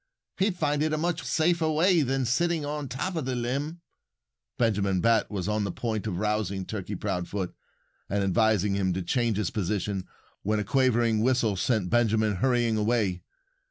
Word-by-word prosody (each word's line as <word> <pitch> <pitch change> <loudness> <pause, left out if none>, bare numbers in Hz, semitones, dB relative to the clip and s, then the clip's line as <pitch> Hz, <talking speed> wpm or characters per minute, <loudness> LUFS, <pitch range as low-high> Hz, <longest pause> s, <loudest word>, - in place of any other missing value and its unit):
He'd 190 -1 +1
find 150 -3 0
it 155 0 +1
a - - +1
much 165 +1 -1
safer 160 +4 +1
way 165 +2 +4
than 135 -1 0
sitting 165 +5 +1
on 145 -1 -3
top 135 +9 -3
of 160 -5 -2
the 130 -1 -1
limb." 140 +8 -3 0.8
Benjamin 100 -5 +1
Bat 115 +2 +3
was 95 -4 -3
on 105 0 0
the 100 - -2
point 110 +1 -3
of 90 -5 -2
rousing 105 -2 -1
Turkey 105 0 -5
Proudfoot 90 +1 -3 0.6
and 100 +1 0
advising 105 0 +2
him 95 -2 +1
to 95 +1 -3
change 115 +3 0
his 105 -4 -1
position 100 -1 -2 0.3
when 105 +1 0
a - - 0
quavering 120 -2 +2
whistle 120 -4 +2
sent 95 -2 0
Benjamin 110 -3 +2
hurrying 120 0 +2
away. 105 -5 +1
115 Hz, 170 wpm, -27 LUFS, 100-135 Hz, 0.8 s, way